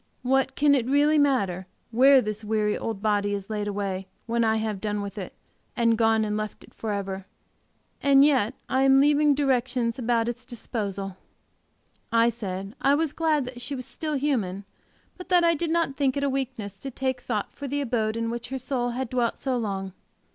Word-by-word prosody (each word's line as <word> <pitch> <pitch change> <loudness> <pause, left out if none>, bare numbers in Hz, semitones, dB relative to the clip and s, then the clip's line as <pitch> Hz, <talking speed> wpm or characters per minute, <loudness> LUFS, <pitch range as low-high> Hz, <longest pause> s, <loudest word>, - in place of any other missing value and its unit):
What 265 +1 +1
can 290 0 +4
it 250 -4 +1
really 295 +3 +4
matter 200 -11 +1 0.2
where 260 +2 +6
this 215 +1 -4
weary 210 0 0
old 220 -3 -4
body 205 -1 +1
is 200 +1 -7
laid 210 -1 -2
away, 195 -2 -3 0.2
when 235 0 +1
I 220 -1 +3
have 220 -3 -2
done 210 -1 -2
with 200 -1 -6
it, 185 - -6 0.5
and 230 -1 +3
gone 225 -1 +3
and 210 0 -2
left 215 0 -4
it - - -18
forever? 195 -3 -4 0.7
And 275 0 +6
yet 260 -5 +2
I 260 - +1
am 270 0 +6
leaving 290 +1 +4
directions 255 -3 0
about 235 -1 +1
its 240 +1 -4
disposal!" 200 -5 -4 0.9
I 230 +1 +4
said 195 -3 -5
I 275 +1 +4
was 310 -1 0
glad 310 -4 +1
that 245 -1 -8
she 280 +3 -4
was 255 -2 -6
still 310 -2 -4
human 220 -9 -1 0.5
but 360 - -9
that 355 -2 +5
I 335 0 +5
did 330 +1 -2
not 325 -5 0
think 275 -1 +1
it 280 - -1
a 280 - +2
weakness 245 -7 -4
to 270 - -5
take 260 0 -2
thought 210 -4 -3
for 285 - -6
the 285 +2 -1
abode 225 -4 -1
in 230 0 -1
which 235 0 -5
her 265 - -3
soul 250 -1 -1
had 260 -1 -2
dwelt 240 -1 0
so 265 -2 -1
long. 195 -5 -3
235 Hz, 200 wpm, -26 LUFS, 210-275 Hz, 0.9 s, where